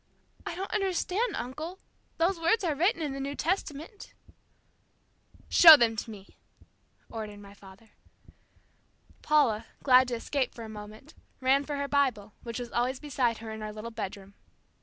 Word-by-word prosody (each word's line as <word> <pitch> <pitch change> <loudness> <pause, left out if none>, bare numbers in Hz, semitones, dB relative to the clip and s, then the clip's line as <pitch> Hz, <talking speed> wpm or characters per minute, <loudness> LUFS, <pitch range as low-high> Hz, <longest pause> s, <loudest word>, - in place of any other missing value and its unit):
"I - - -4
don't 385 +2 -5
understand, 400 +2 -1
uncle. 305 +9 -6 0.4
Those 340 +2 +1
words 340 +7 +2
are 330 -4 +1
written 335 +3 +1
in 290 -3 -3
the 275 - -6
New 280 +1 -4
Testament." 335 +2 -4 1.3
"Show 320 -3 +10
them 230 -3 +2
to 220 - -4
me," 200 -3 -12 0.7
ordered 215 -2 -7
my 200 0 -13
father. 200 +2 -17 1.3
Paula, 235 -8 +2 0.2
glad 255 -1 +6
to 245 - -2
escape 260 +2 -2
for 230 - -8
a 220 - -8
moment, 215 +7 -11 0.3
ran 270 +2 +2
for 290 - -4
her 280 0 -2
Bible, 255 -8 0
which 230 -1 -6
was 245 -1 -6
always 250 +2 -1
beside 255 -6 -1
her 225 -1 -8
in 220 0 -7
our 215 0 -5
little 215 +2 -8
bedroom. 200 -3 -7
260 Hz, 160 wpm, -28 LUFS, 220-310 Hz, 1.3 s, Show